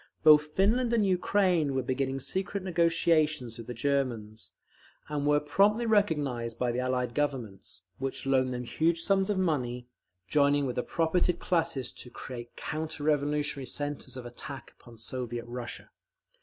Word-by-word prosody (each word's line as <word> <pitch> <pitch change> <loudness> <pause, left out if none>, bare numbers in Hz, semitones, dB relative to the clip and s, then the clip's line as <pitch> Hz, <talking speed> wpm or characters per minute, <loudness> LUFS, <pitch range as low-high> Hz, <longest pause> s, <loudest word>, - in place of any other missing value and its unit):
Both 150 -1 +7
Finland 235 +5 +3
and 220 -3 +3
Ukraine 180 -5 +2
were 130 - 0
beginning 135 +1 -1
secret 190 +7 -1
negotiations 160 -8 +2
with 115 - -8
the 125 - -4
Germans, 115 -6 -2 0.6
and 145 -1 -1
were 145 0 +4
promptly 200 +10 +3
recognised 145 - +1
by 125 0 0
the 120 - -2
Allied 125 -1 -1
Governments, 115 -12 -3 0.2
which 135 0 -3
loaned 130 -1 +2
them 125 0 -3
huge 165 +6 0
sums 195 0 +2
of 205 - +1
money, 125 -9 -1 0.4
joining 145 -1 +3
with 125 - -3
the - - +2
propertied 170 +4 +1
classes 160 -9 0
to 125 - -8
create 120 -1 -8
counter 155 -1 -4
revolutionary 145 -2 0
centres 145 -1 -4
of 125 - -7
attack 120 +2 -9
upon 120 -1 -15
Soviet 120 0 -4
Russia. 120 0 -7
140 Hz, 150 wpm, -29 LUFS, 125-165 Hz, 0.6 s, Both